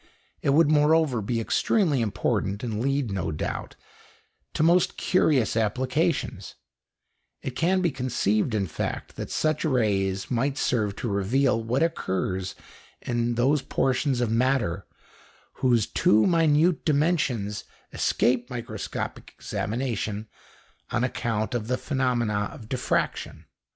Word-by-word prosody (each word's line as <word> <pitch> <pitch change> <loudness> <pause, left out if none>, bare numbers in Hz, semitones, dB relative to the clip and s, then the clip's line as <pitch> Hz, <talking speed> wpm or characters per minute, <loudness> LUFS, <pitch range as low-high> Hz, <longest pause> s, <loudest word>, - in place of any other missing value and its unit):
It - - 0
would, 150 +2 +5
moreover, 150 -4 +3
be 115 +3 -1
extremely 150 - +1
important, 100 -1 -1
and 110 -3 -2
lead, 135 -3 0
no 95 -4 -2
doubt, 75 - -4 0.8
to - - +2
most 170 +2 +3
curious 145 -11 +2
applications; 125 - -1 0.9
it - - -3
can 185 +3 +2
be 170 - +2
conceived, 120 -3 0
in 100 -2 +1
fact, 85 - -4
that - - -6
such 155 -1 0
rays 100 - 0
might 135 +3 0
serve 105 -8 0
to 120 - -4
reveal 115 +5 +1
what 125 +7 +1
occurs 95 - -2 0.5
in 120 -1 -1
those 135 +5 +2
portions 130 -1 0
of 120 -3 0
matter 115 -7 +1 0.7
whose 120 -4 +3
too 110 +1 +3
minute 165 -1 +3
dimensions 140 - 0 0.3
escape 125 0 +1
microscopic 115 -4 -5
examination 110 -2 -3 0.6
on 115 - 0
account 115 -3 -1
of 115 -3 -2
the 125 +1 0
phenomena 120 -8 0
of 110 - -11
diffraction. 125 +1 -2
125 Hz, 120 wpm, -26 LUFS, 110-145 Hz, 0.9 s, would